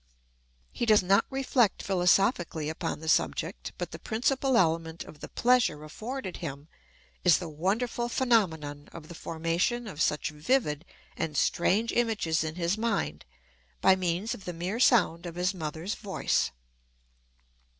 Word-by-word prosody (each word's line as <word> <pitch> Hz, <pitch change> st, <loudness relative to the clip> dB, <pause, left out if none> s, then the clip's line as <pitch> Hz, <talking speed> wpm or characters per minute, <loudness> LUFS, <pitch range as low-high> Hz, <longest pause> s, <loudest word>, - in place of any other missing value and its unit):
He 240 Hz, -, -2 dB
does 215 Hz, -3 st, +6 dB
not 195 Hz, +2 st, +4 dB
reflect 265 Hz, -5 st, +1 dB
philosophically 180 Hz, -, +2 dB
upon 160 Hz, -1 st, -4 dB
the 160 Hz, -, -7 dB
subject, 160 Hz, -, 0 dB
but -, -, -4 dB
the -, -, -8 dB
principal 260 Hz, +3 st, +1 dB
element 165 Hz, -1 st, +1 dB
of 150 Hz, -, -13 dB
the -, -, -7 dB
pleasure 240 Hz, -12 st, +2 dB
afforded 215 Hz, -, -6 dB
him 145 Hz, -2 st, -6 dB, 0.6 s
is 180 Hz, -3 st, +6 dB
the 175 Hz, -, -5 dB
wonderful 215 Hz, +10 st, -1 dB
phenomenon 160 Hz, -, 0 dB
of 155 Hz, -2 st, -10 dB
the -, -, -8 dB
formation 165 Hz, +9 st, -1 dB
of 165 Hz, -6 st, -6 dB
such 150 Hz, 0 st, +1 dB
vivid 155 Hz, -, 0 dB, 0.3 s
and 150 Hz, -2 st, -3 dB
strange 205 Hz, +11 st, +2 dB
images 210 Hz, -10 st, +1 dB
in 160 Hz, 0 st, -4 dB
his 175 Hz, +4 st, -1 dB
mind 75 Hz, -, -1 dB, 0.5 s
by 190 Hz, -, +5 dB
means 185 Hz, +4 st, -1 dB
of 195 Hz, -, -10 dB
the 180 Hz, -, -4 dB
mere 180 Hz, +7 st, -3 dB
sound 180 Hz, -9 st, +3 dB
of 170 Hz, -, -7 dB
his 180 Hz, +2 st, 0 dB
mother's 165 Hz, +3 st, -4 dB
voice. 200 Hz, -3 st, 0 dB
180 Hz, 145 wpm, -28 LUFS, 160-225 Hz, 0.6 s, does